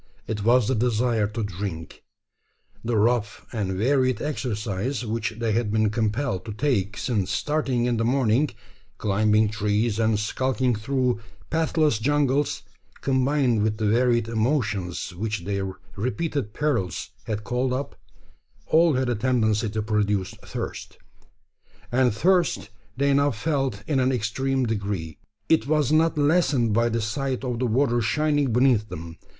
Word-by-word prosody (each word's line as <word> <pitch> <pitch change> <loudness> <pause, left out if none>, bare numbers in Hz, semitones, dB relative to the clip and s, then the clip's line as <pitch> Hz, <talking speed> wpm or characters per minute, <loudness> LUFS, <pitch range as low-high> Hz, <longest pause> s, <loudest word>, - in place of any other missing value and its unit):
It 105 -2 -3
was 120 0 +4
the 130 - +2
desire 115 -2 +1
to 110 +2 -4
drink. 95 -4 -6 0.8
The 115 -1 0
rough 110 0 +1
and 100 -4 -1
varied 130 +5 +2
exercise 120 -3 -3
which 110 0 -2
they 115 -1 -1
had 110 -1 0
been 110 -1 +2
compelled 110 0 -1
to 110 - -5
take 105 -5 0
since 105 -7 -1
starting 125 +3 0
in 120 -1 +1
the 115 - 0
morning 125 +2 +2 0.5
climbing 105 +1 +2
trees, 105 +1 0
and 110 -1 +2
skulking 130 +4 0
through 125 +2 0 0.3
pathless 155 -6 +2
jungles 140 -2 +1 0.4
combined 130 -3 +2
with 105 0 0
the 110 - -1
varied 120 +1 +2
emotions 110 - -1
which 110 +1 -3
their 100 -1 -2 0.2
repeated 130 +2 -2
perils 140 -13 -1
had 105 -1 -3
called 125 +4 -1
up 135 +2 -3 0.7
all 165 +4 +4
had 130 0 0
a 120 - +1
tendency 110 -2 +1
to 110 +1 -2
produce 105 -3 0
thirst; - - -6 0.9
and 125 0 +3
thirst 170 - +1 0.3
they 140 +1 +2
now 140 +1 +3
felt 135 -4 -2
in 135 +2 +1
an 130 0 +2
extreme 130 +3 0
degree. 100 -8 -3 0.3
It 160 -4 +3
was 150 -2 +2
not 160 0 +3
lessened 145 -7 +2
by 115 +2 +3
the 115 0 -1
sight 130 +4 -2
of 125 -3 -2
the 125 - +1
water 120 +1 +2
shining 145 +3 +1
beneath 120 -3 +3
them. 80 +1 -8
115 Hz, 145 wpm, -25 LUFS, 105-135 Hz, 0.9 s, was